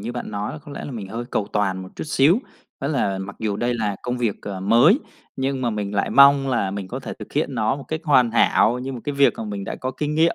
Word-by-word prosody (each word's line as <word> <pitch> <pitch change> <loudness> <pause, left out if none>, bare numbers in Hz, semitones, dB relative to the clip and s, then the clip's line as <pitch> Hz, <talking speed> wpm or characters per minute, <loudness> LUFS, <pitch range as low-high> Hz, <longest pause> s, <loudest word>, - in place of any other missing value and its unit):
như 115 +4 -5
bạn 120 - -5
nói 105 +1 -3
là - - -7
có 145 -1 -12
lẽ - - -6
là - - -6
mình 110 -7 -6
hơi 115 +4 -5
cầu 100 - -1
toàn 95 -3 0
một 95 - -9
chút - - -4
xíu, 150 +5 +4 0.4
đó 140 - -1
là 100 -10 0
mặc 100 +1 -7
dù 105 -2 -2
đây 120 +2 0
là 105 -3 -1
công 125 0 -2
việc, 115 -5 0
ờ, 100 -2 -5
mới, 120 - +5 0.4
nhưng 135 0 -1
mà 120 - +1
mình 105 -2 -3
lại 100 - 0
mong 140 0 +6
là 120 -7 0
mình 100 -1 -5
có - - -5
thể - - -6
thực - - -10
hiện - - -1
nó 110 +3 +1
một 140 - -9
cách 155 0 -2
hoàn 130 -7 +4
hảo 120 +1 +3
như 130 +2 -5
một 125 - -6
cái 145 - -2
việc 140 0 +5
mà 115 - -5
mình 100 -2 -5
đã - - -4
có 130 - -4
kinh 150 +3 -3
nghiệm 165 +2 +3
120 Hz, 290 wpm, -22 LUFS, 100-140 Hz, 0.4 s, mong